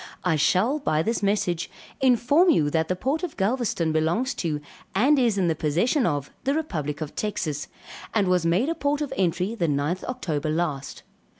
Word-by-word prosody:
I 180 -3 +2
shall 190 - +2
by 155 - +1
this 230 +2 -1
message 195 -4 0 0.3
inform 265 +7 +4
you, 150 - +3
that 160 0 +1
the 185 - 0
port 270 - -1
of 360 -4 -5
Galvezton 200 -6 0
belongs 170 +12 +1
to 155 -4 -2 0.4
and 270 +8 +4
is 235 -5 +2
in 185 -3 +2
the 165 - +2
possession 175 - +1
of 145 -4 -2
the 275 +2 +1
republic 155 - -3
of 155 -1 -4
Texas, 170 -9 -3 0.4
and 205 -4 +1
was 180 -2 +2
made 180 - +2
a - - +1
port 290 -2 -1
of 290 - -3
entry 185 +2 0
the 175 -8 -1
9th 150 +5 -1
October 160 - -3
last. 155 -4 -2
185 Hz, 185 wpm, -25 LUFS, 160-255 Hz, 0.4 s, inform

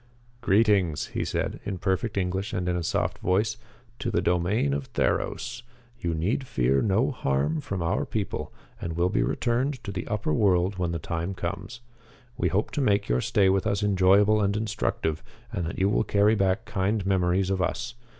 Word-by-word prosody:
"Greetings," 100 -8 +2
he - - -1
said, - - -2
in 100 -2 -3
perfect 95 +4 -1
English 95 +2 -1
and 90 0 -2
in 90 - +1
a 90 - -1
soft 80 - -1
voice, 105 +4 +1 0.4
"to - - -2
the - - +1
domain 90 -4 +1
of 70 -1 -3
Theros. - - -1 0.4
You 85 -5 -1
need 105 - -1
fear 65 - +2
no 110 +7 +2
harm 75 - 0
from 95 -3 -3
our 85 - 0
people 110 -6 -3 0.3
and 85 - -3
will 85 +2 +2
be - - +1
returned 130 +4 0
to 105 - -5
the 90 -2 -5
upper 105 -8 -1
world 95 0 +2
when 90 -2 0
the 85 - -1
time 85 +4 -3
comes. 100 +8 -5 0.5
We 125 - 0
hope 105 +3 0
to 145 - -1
make 100 -5 +2
your - - +2
stay 100 -2 +3
with 95 +2 +2
us 100 -1 0
enjoyable 100 +2 +4
and 100 +1 +1
instructive, 95 -7 -1 0.3
and 85 -2 -2
that - - -5
you 95 - +2
will 105 - +2
carry 105 0 +3
back 100 +1 +1
kind 100 0 -1
memories 95 0 +2
of 95 -1 0
us. 120 +7 -2
95 Hz, 190 wpm, -26 LUFS, 90-105 Hz, 0.5 s, enjoyable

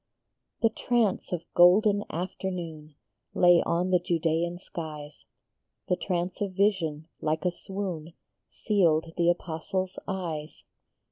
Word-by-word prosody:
HE 225 - +6
trance 230 -3 0
of 175 -2 -2
golden 205 +4 +6
afternoon 170 -4 -5 0.4
Lay 175 -1 +6
on 180 +2 0
the 180 - +5
Judaean 170 0 0
skies; 155 -4 -8 0.6
The 180 - +3
trance 180 0 -3
of 200 -2 -1
vision, 175 -6 +1
like 155 +2 -1
a 180 - +3
swoon, 175 -4 -5 0.3
Sealed 165 -6 +1
the 170 0 +3
Apostle 175 +2 -1
s 185 - -10
eyes. 165 -6 -4
175 Hz, 120 wpm, -28 LUFS, 160-190 Hz, 0.6 s, HE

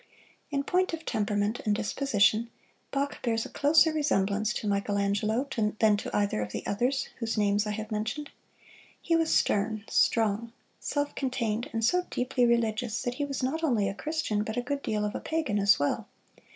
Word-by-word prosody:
In 280 -2 -1
point 365 +4 +1
of 325 0 -5
temperament 205 +1 0
and 210 -1 +1
disposition 220 -1 +2 0.4
Bach 280 +1 -2
bears 225 -2 0
a - - -8
closer 310 +2 +4
resemblance 215 -8 +1
to 215 - -3
Michelangelo 205 +4 0 0.3
than 215 -1 +4
to - - -5
either 205 - 0
of 105 0 -4
the - - -5
others 250 +6 0
whose 230 -1 -2
names 205 0 +2
I - - -1
have 215 +1 -6
mentioned. 225 +8 -3 0.7
He 335 - +1
was 325 -1 +2
stern, 210 +1 +1
strong, 225 +1 +2 0.3
self 290 0 -2
contained, 245 -2 -2
and 225 -1 0
so 360 +6 +2
deeply 250 -1 +1
religious 235 -1 +1
that 245 - -1
he - - +1
was 275 -2 -4
not 315 +6 -1
only 235 -10 +2
a 195 - -2
Christian 300 -5 -2
but 220 +1 -5
a 245 - 0
good 280 +3 -2
deal 210 -4 -1
of 210 - -3
a - - -3
pagan 305 -10 -1
as 200 0 +5
well. 145 - -1
225 Hz, 180 wpm, -28 LUFS, 210-280 Hz, 0.7 s, as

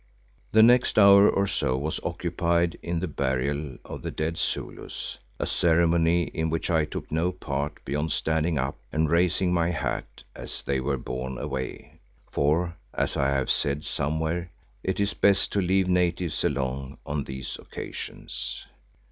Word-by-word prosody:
The 110 0 +7
next 125 +2 +5
hour 100 -1 +8
or 100 - +2
so 65 -9 0
was 75 +3 -2
occupied 85 0 0
in 85 -1 -2
the 95 - -1
burial 70 0 -1
of - - -7
the - - -4
dead 80 +1 -2
Zulus, 85 - -4 0.2
a - - -1
ceremony 85 0 +3
in 80 -1 -2
which 80 +3 -1
I 80 -2 +3
took 75 - -7
no 80 +3 +1
part 75 -4 -4
beyond 75 +3 -1
standing 80 +1 +1
up 65 +1 -2
and 80 0 +1
raising 90 +1 +3
my 85 -1 +2
hat 85 - -3
as - - -7
they 70 -1 0
were 70 +1 0
borne 65 +1 -4
away, 65 0 -5 0.3
for 85 +4 +1 0.2
as - - 0
I 70 -1 +2
have 70 -2 +1
said 70 +1 +1
somewhere, 80 +4 -1 0.3
it 95 +1 -2
is 100 0 +1
best 100 -1 +3
to 100 - +1
leave 95 +1 +2
natives 90 -2 +1
alone 65 -1 -2
on 70 -1 -2
these 65 -1 -6
occasions. - - -6
80 Hz, 155 wpm, -26 LUFS, 70-90 Hz, 0.3 s, hour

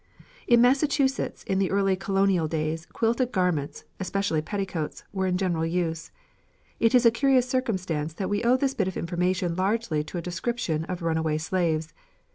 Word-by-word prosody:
In 240 -1 +6
Massachusetts 270 +1 +2
in 190 0 -1
the 195 - +1
early 195 -1 +2
colonial 195 -3 +1
days 160 +1 -2
quilted 235 +2 0
garments, 165 - -1 0.2
especially 190 -4 -1
petticoats, 185 -3 -4
were 190 -1 0
in 180 -1 +1
general 175 -4 0
use. 165 -1 -2 0.7
It 230 +2 +3
is 245 -1 +5
a 230 - +8
curious 255 +1 +3
circumstance 185 - -1
that 190 - -3
we 205 +3 -1
owe 245 +2 +4
this 270 0 0
bit 195 -7 0
of 190 - -4
information 180 +1 -1
largely 190 -4 0
to 175 - -6
the - - -2
description 175 -3 -2
of 180 0 -5
runaway 160 -2 0
slaves. 160 -1 -1
185 Hz, 165 wpm, -26 LUFS, 165-225 Hz, 0.7 s, a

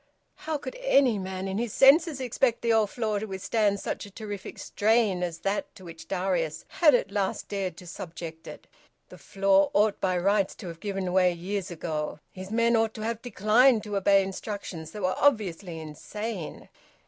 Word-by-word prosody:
How 315 -1 -4
could - - -7
any 275 - +3
man 190 0 -4
in 195 +2 -2
his 235 -3 -2
senses 295 +2 +5
expect 245 -1 0
the 230 -1 +3
old 220 -2 +3
floor 215 -3 -1
to 220 - -5
withstand 200 +1 0
such - - -4
a 205 - -9
terrific 205 -1 -7
strain 215 -3 +1
as 170 -2 -2
that 245 +10 -2
to 185 - -13
which 165 -1 -11
Darius 180 -4 -1
had 300 -6 +5
at 235 - -1
last 200 -2 -2
dared 190 -4 -3
to 180 - -11
subject 165 -1 -8
it? - - -10 0.4
The - - -13
floor 195 0 +2
ought 210 0 +3
by 185 -1 +1
rights 195 +2 +1
to 190 - -9
have 165 -1 -9
given 195 -2 -3
way 185 -1 +4
years 190 +2 -4
ago! 155 -3 -4
His 190 0 -9
men 230 +2 +2
ought 225 -1 +1
to 215 - -7
have 230 0 -3
declined 230 +1 +3
to 210 -2 -5
obey 195 0 +4
instructions 190 -4 -6
that 205 +4 -7
were 185 - +2
obviously 195 - +1
insane. 175 +5 -6
200 Hz, 185 wpm, -27 LUFS, 185-225 Hz, 0.4 s, senses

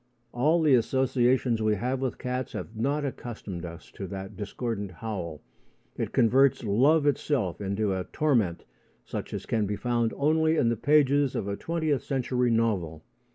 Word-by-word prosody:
All 155 +7 +2
the 150 -3 +5
associations 125 -1 +2
we 110 -1 +2
have 125 +6 -2
with 130 -2 -2
cats 125 -1 -3
have 110 - -6
not 140 +6 0
accustomed 105 -9 -6
us 85 0 -10
to 95 - -7
that 95 0 -7
discordant 105 0 -4
howl. 90 -6 -5 0.5
It - - -3
converts 130 +3 +4
love 135 +9 +3
itself 135 - 0
into 100 +1 0
a 95 -1 -3
torment 120 - 0 0.4
such - - -5
as - - -5
can 110 -3 0
be 105 - -2
found 120 0 0
only 160 +2 +3
in 115 - +3
the 115 - +1
pages 145 +1 +3
of 100 - -2
a 100 - -2
twentieth 155 -2 -1
century 125 -1 0
novel. 100 -9 0
120 Hz, 160 wpm, -27 LUFS, 100-140 Hz, 0.5 s, the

